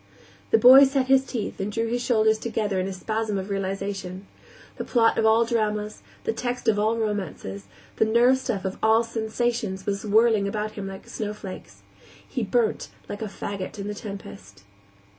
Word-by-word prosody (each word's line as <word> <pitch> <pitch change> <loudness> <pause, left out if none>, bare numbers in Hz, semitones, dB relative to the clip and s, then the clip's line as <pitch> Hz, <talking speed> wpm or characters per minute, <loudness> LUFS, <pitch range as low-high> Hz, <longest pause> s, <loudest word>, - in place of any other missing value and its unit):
The 450 - +5
boy 265 - +9
set 270 -1 +1
his 265 0 +5
teeth 225 -5 -4
and 195 +2 -2
drew 225 +2 -1
his 240 +2 -1
shoulders 220 -3 +2
together 215 -4 -1
in 185 - -1
a - - -4
spasm 215 +2 -2
of 190 +1 -5
realization; 195 -1 -4 0.5
the - - -3
plot 230 -2 +3
of 220 - +3
all 225 +1 +4
dramas, 215 -2 -1 0.2
the 450 - -1
text 245 -1 -4
of 210 -2 +3
all 220 +2 +1
romances, 190 - -4 0.3
the - - +4
nerve 240 +4 +4
stuff 225 -7 -3
of 190 - -4
all 220 +1 +4
sensations 225 -3 -2
was 200 -1 -2
whirling 215 -1 +3
about 210 +1 -3
him 205 -2 -6
like 195 0 -8
the - - -14
snowflakes. 210 -3 -7 0.4
He - - -3
burnt 460 -3 0 0.2
like 205 - -6
a - - -2
faggot 200 -1 -6
in 200 0 -5
a - - -4
tempest. 195 - -9
215 Hz, 180 wpm, -25 LUFS, 200-230 Hz, 0.5 s, boy